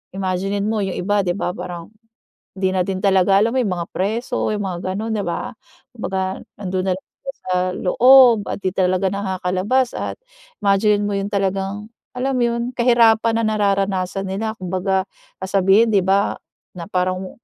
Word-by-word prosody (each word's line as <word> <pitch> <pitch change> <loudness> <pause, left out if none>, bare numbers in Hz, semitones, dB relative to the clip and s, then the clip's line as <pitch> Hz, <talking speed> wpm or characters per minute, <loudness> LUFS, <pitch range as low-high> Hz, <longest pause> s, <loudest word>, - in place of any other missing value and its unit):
imaginine 195 +1 -2
mo 215 -1 0
'yong 195 - -3
iba 205 +2 +1
'di 175 0 0
ba - - -1
parang, 175 -2 -7 0.7
'di 190 0 +1
natin 185 +1 -1
talaga 195 0 +4
alam 225 +2 +2
mo - - +3
'yung 205 - -1
mga 170 -1 -4
preso, 215 +5 -1
'yung 205 -1 -2
mga 180 -2 -4 0.2
gano'n, 220 +2 -3
'di 205 - -1
ba? 170 - -3 0.4
'Kumbaga 190 -4 -3 0.2
nando'n 185 -1 -2
na - - +3
lang - - -17 0.2
sila 270 - -4 0.2
sa 185 - 0 0.2
loob 250 +4 +6
at - - -3
'di 185 - 0
talaga 185 0 +1
nakakalabas 195 +5 -1
at - - -4 0.5
imaginine 205 +1 +3
mo 205 - -2
'yung 195 +1 -3
talagang, 195 +1 -2 0.3
alam 265 +2 -1
mo 245 - +2
yun, 235 +1 -2
kahirapan 230 -2 +4
na - - -2
nararanasan 195 -2 0
nila. 215 +3 -3
Kumbaga 185 +1 -1 0.4
sasabihin 195 +3 +3
'di 200 - +4
ba, 195 +1 +2 0.4
na 170 - -5
parang 185 -1 0
mu 190 - -6
195 Hz, 170 wpm, -20 LUFS, 185-215 Hz, 0.7 s, loob